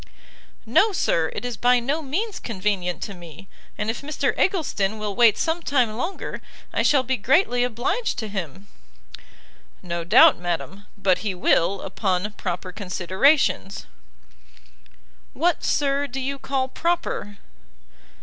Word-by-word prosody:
"No, 380 - +4
Sir, 165 - +1
it - - -4
is 245 -3 -4
by 245 0 +4
no 280 +7 -1
means 385 +10 -3
convenient 190 -5 -2
to 200 - -6
me; 175 0 -12 0.3
and 210 - -2
if 225 - -2
Mr 295 +2 -1
Eggleston 220 - 0
will 210 -2 -4
wait 230 -2 +5
some 330 +1 -1
time 250 -8 +1
longer, 340 - -4 0.3
I - - +1
shall 275 -3 +3
be 260 +1 -1
greatly 245 - +2
obliged 250 - -1
to 220 - -3
him." 190 -2 -6 1.2
"No 170 -1 -3
doubt, 250 - +6
madam, 180 +3 -4
but 195 -2 +2
he 205 -4 -3
will, 180 +2 +2
upon 190 0 -1
proper 180 -2 -4
considerations." 195 - +1 1.5
"What, 340 +3 +1
Sir, 285 0 +1
do 270 0 -5
you 275 +1 -3
call 265 -1 -1
proper?" 325 -9 -2
225 Hz, 135 wpm, -23 LUFS, 190-280 Hz, 1.5 s, doubt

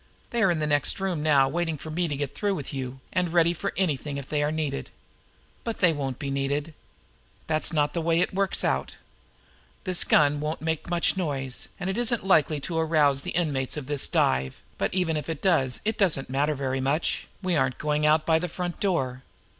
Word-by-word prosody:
They 235 - 0
are 195 - +5
in 175 - +2
the 155 - 0
next 145 +2 +2
room 190 -5 -1
now 145 -3 +4
waiting 165 +2 -1
for 155 +2 -8
me 170 +2 0
to 150 - -2
get 140 -1 -3
through 205 -2 0
with 145 -4 -6
you, 130 -1 -5
and 180 -2 +1
ready 170 0 +4
for 170 - -3
anything 150 -6 -1
if 140 -2 -6
they 150 -1 0
are 145 +1 +1
needed. 155 -3 -2 0.7
But 230 -1 -3
they 175 -3 +4
won't 135 -4 -3
be 140 -2 -4
needed. 140 +3 -1 0.7
That's 155 -1 +1
not 150 -2 +1
the 170 - -1
way 165 0 +2
it 180 - +1
works 195 0 0
out. - - 0 0.9
This 185 -3 +1
gun 145 -1 +4
won't 150 +2 -3
make 160 +1 -2
much 175 +2 +2
noise, 135 -8 -3
and 180 - -3
it 190 +4 -1
isn't 235 -3 0
likely 155 -5 +3
to 165 +2 -2
arouse 150 -4 +3
the - - -5
inmates 145 -6 -1
of 150 - -4
this 145 0 0
dive, 65 0 +1 0.2
but - - 0
even 180 -4 0
if 150 - -5
it 160 -3 -3
does, 150 -9 +2
it 220 +1 -1
doesn't 155 -10 +1
matter 145 +3 +1
very 135 -1 -2
much 140 +5 0 0.2
we 185 -2 +1
aren't 130 -4 +1
going 150 0 0
out 155 +1 +4
by 160 -1 +4
the 180 +1 -3
front 175 +1 -4
door. 135 -10 0
155 Hz, 215 wpm, -26 LUFS, 140-175 Hz, 0.9 s, are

